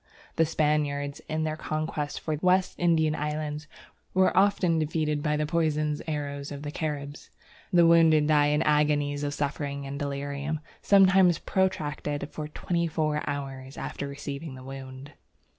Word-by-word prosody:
The 165 - +3
Spaniards, 150 -1 0
in 155 0 -1
their 155 -1 -1
conquest 155 -1 -3
of - - -27
the 155 -2 -1
West 185 0 +3
Indian 160 -3 +3
islands, 150 0 -3 0.5
were 185 0 +4
often 190 -4 +3
defeated 150 -1 0
by 150 0 0
the 150 - 0
poisoned 155 -2 0
arrows 145 -2 -4
of 145 0 -7
the 145 - -4
Caribs. 145 -2 -5 0.4
The 175 -2 +6
wounded 165 -2 +6
died 150 -1 +4
in 150 - +2
agonies 150 -1 +2
of 145 0 -2
suffering 140 -1 -3
and 140 +1 -5
delirium, 140 +1 -3 0.2
sometimes 190 -3 +5
protracted 150 -6 -1
for 150 -1 -5
twenty 170 +2 -1
four 155 -1 0
hours 135 -1 -5
after 140 - -4
receiving 140 +1 -6
the 130 - -11
wound. 135 +1 -9
150 Hz, 150 wpm, -27 LUFS, 145-160 Hz, 0.5 s, The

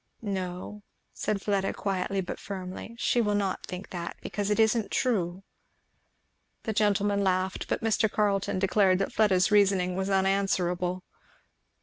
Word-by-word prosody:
"No," 190 0 -4 0.3
said 200 -2 -2
Fleda, 195 -2 0
quietly 195 0 -1
but 180 - -6
firmly, 190 +3 -7
"she 240 0 +2
will 210 -2 +1
not 195 -2 -1
think 185 +1 -7
that, 170 -2 -5
because 205 -1 -3
it 210 - +1
isn't 220 -1 +3
true." 190 -7 0 1.2
The 220 - -2
gentlemen 205 -1 +2
laughed, 185 0 0
but - - -2
Mr. 220 -1 +2
Carleton 200 -3 +1
declared 190 0 +3
that 195 - -2
Fleda's 195 -2 +3
reasoning 195 -3 +3
was 190 +1 -1
unanswerable. 185 -2 +1
195 Hz, 135 wpm, -28 LUFS, 185-205 Hz, 1.2 s, isn't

